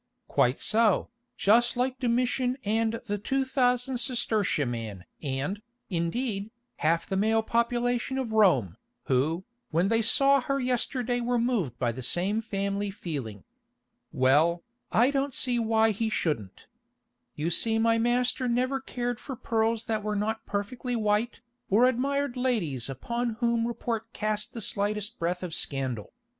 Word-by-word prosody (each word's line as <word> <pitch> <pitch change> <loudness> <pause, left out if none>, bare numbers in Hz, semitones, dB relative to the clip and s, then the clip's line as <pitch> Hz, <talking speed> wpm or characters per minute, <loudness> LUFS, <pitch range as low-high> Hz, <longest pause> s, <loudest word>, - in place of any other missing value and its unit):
"Quite 125 +2 +2
so, 220 -2 +2 0.3
just 235 +4 +3
like 255 +1 0
Domitian 250 +1 +1
and 225 +2 0
the 205 -2 -2
two 270 +6 0
thousand 250 -1 +1
sestertia 220 - 0
man 110 -6 -5 0.2
and, 145 +8 -3 0.3
indeed, 200 +5 -1 0.3
half 165 +3 +1
the 195 - -3
male 220 +3 +2
population 240 +2 0
of 255 -4 -2
Rome, 140 - +3 0.3
who, 150 +7 +1 0.3
when 170 +5 +2
they 225 0 +3
saw 275 +4 +5
her 275 +2 -1
yesterday 250 -1 -1
were 245 +1 +1
moved 230 - 0
by 120 -2 0
the 125 +3 -7
same 190 - +1
family 200 -2 -2
feeling. 140 - -6 0.7
Well, 155 +7 +3 0.3
I 245 +5 +4
don't 275 -1 -1
see 245 -2 +2
why 225 -1 +3
he 220 +2 -1
shouldn't. 145 - -2 0.7
You 155 +3 -1
see 225 +6 +2
my 230 0 +3
master 245 +2 +1
never 255 +3 +1
cared 245 -3 -3
for 265 - -6
pearls 225 -1 0
that 220 -1 -1
were 210 0 -2
not 220 +2 -2
perfectly 240 +5 -3
white, 215 +1 0 0.3
or 220 +6 +5
admired 270 +1 0
ladies 200 - -1
upon 235 - -3
whom 235 0 +1
report 230 -1 -3
cast 210 0 -2
the 230 - -6
slightest 210 +2 -3
breath 175 +2 -1
of 175 -3 -5
scandal. 130 -8 -3
220 Hz, 145 wpm, -28 LUFS, 180-245 Hz, 0.7 s, saw